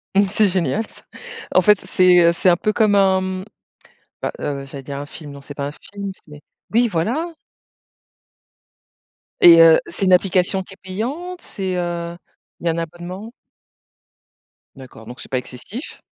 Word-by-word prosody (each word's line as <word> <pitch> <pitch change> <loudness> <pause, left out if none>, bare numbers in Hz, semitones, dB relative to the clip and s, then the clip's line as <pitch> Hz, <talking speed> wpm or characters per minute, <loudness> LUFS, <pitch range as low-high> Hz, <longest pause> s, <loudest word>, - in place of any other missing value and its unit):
Mmh 200 +1 +5
c'est 205 +1 +2
génial 185 +3 0
ça. - - -19 0.5
En - - +7
fait, 210 -2 +5
c'est, 185 -1 +5
heu, 170 -1 +5
c'est 185 - +2
un 175 - +4
peu 215 - 0
comme 215 -2 +3
un 190 -1 +4
mmh, 185 0 -4 0.8
bah, - - -2
heu, 140 -2 -3
j'allais 135 0 -9
dire 140 0 -6
un 145 - -6
film, 150 -1 -10
non 140 - -10
c'est 145 +1 -10
pas 140 0 -3
un - - -7
film, 200 +5 -8 0.2
c'est 150 -1 -13 0.3
oui 235 +2 +4
voilà! 235 - -1 2.1
Et 170 -1 +10
heu, 165 -1 +8
c'est 195 - -2
une 185 - +4
application 185 +1 +2
qui 190 0 -12
est - - -35
payante, 275 - -5
c'est, 190 -2 -4
heu, 170 -1 -3 0.4
il - - -10
y - - +4
a - - +3
un - - -5
abonnement? 175 +6 -6 1.4
D'accord, 130 -4 -13
donc 125 +3 -10
c'est - - -10
pas 130 - 0
excessif. 130 - -8
180 Hz, 180 wpm, -20 LUFS, 160-200 Hz, 2.1 s, Et